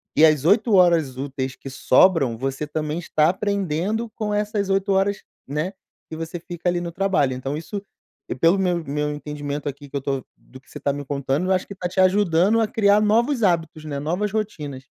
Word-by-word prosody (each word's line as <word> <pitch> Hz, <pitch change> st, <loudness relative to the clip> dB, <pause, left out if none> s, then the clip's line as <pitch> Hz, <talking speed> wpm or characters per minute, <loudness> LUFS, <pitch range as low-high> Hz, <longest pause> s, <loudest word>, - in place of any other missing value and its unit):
e 155 Hz, -, +5 dB
as 155 Hz, -2 st, +3 dB
8 215 Hz, +4 st, +4 dB
horas 165 Hz, -8 st, +4 dB
úteis 130 Hz, -1 st, -4 dB
que 135 Hz, -, -9 dB
sobram, 135 Hz, -3 st, +3 dB
você 135 Hz, +3 st, -3 dB
também 155 Hz, +2 st, -3 dB
está 155 Hz, -2 st, +2 dB
aprendendo 200 Hz, +3 st, -1 dB
com 215 Hz, -2 st, -3 dB
essas 205 Hz, -1 st, -1 dB
8 195 Hz, +1 st, +1 dB
horas, 195 Hz, +1 st, +1 dB, 0.2 s
né, 155 Hz, +7 st, -2 dB, 0.4 s
que 160 Hz, -, -6 dB
você 165 Hz, +2 st, -5 dB
fica 175 Hz, 0 st, -3 dB
ali 175 Hz, -, 0 dB
no 170 Hz, -1 st, -5 dB
trabalho. 175 Hz, -8 st, +1 dB
Então 135 Hz, +3 st, -4 dB
isso 200 Hz, +5 st, -6 dB, 0.5 s
e -, -, -2 dB
pelo 165 Hz, +8 st, +3 dB
meu 175 Hz, -3 st, 0 dB
meu 150 Hz, +1 st, -2 dB
entendimento 145 Hz, -1 st, -5 dB
aqui 140 Hz, 0 st, -6 dB
que 140 Hz, -, -10 dB
eu -, -, -3 dB
tô 135 Hz, -1 st, -2 dB
do 130 Hz, 0 st, -16 dB
que -, -, -27 dB
você 150 Hz, -, -9 dB
tá 140 Hz, 0 st, 0 dB
me 145 Hz, -, -5 dB
contando, 140 Hz, +4 st, -1 dB
eu -, -, +1 dB
acho 185 Hz, -, -1 dB
que 200 Hz, -, -7 dB
tá 180 Hz, -1 st, -3 dB
te 190 Hz, -, -3 dB
ajudando 190 Hz, +2 st, +4 dB
a 220 Hz, -, +2 dB
criar 205 Hz, -1 st, +3 dB
novos 235 Hz, +5 st, +2 dB
hábitos, 165 Hz, -4 st, 0 dB
né, 140 Hz, -2 st, -4 dB
novas 180 Hz, +7 st, -1 dB
rotinas. 150 Hz, -11 st, -4 dB
165 Hz, 210 wpm, -23 LUFS, 145-195 Hz, 0.5 s, e